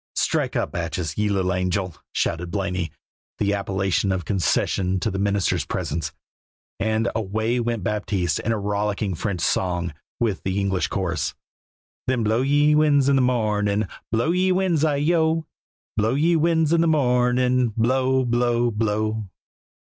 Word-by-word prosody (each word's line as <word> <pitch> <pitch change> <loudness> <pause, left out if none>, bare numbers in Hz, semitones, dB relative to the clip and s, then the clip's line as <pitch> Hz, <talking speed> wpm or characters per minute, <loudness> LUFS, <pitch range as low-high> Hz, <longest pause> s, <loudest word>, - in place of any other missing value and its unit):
"Strike - - 0
up, - - -1
Batchees, 85 -2 -3
ye 105 0 0
little 95 -2 +1
angel!" 90 -1 -1 0.2
shouted 85 +1 -1
Blaney, 90 -3 -2 0.5
the 100 0 +1
appellation 95 -1 0
a 95 - 0
concession 95 +1 0
to 110 - -1
the 95 - -3
minister's 100 -2 +1
presence; 75 -1 -3 0.7
and 110 +1 +1
away 110 +3 -1
went 115 -4 -2
Baptiste 100 -6 -1
in 115 - -1
a 110 - +1
rollicking 105 -1 -1
French 90 +1 -3
song 90 -3 0 0.3
with 110 -5 0
the 95 +1 -1
English 95 -2 0
chorus 85 -6 -2 0.7
Then 125 -3 +1
blow, 110 +3 +2
ye 145 +2 +3
winds, 145 -3 +4
in 140 - +4
the 135 - +4
morning, 105 -4 +1 0.3
Blow, 115 +8 +1
ye 185 +1 +2
winds, 180 -4 +1
ay 145 -2 +1
oh! 160 -1 +2 0.5
Blow, 110 +3 +1
ye 165 +4 +3
winds, 160 -1 +2
in 170 - +4
the 170 - +3
morning, 125 -4 +2
Blow, 130 +2 +2
blow, 120 0 +1
blow. 110 -1 -1
110 Hz, 150 wpm, -23 LUFS, 95-130 Hz, 0.7 s, winds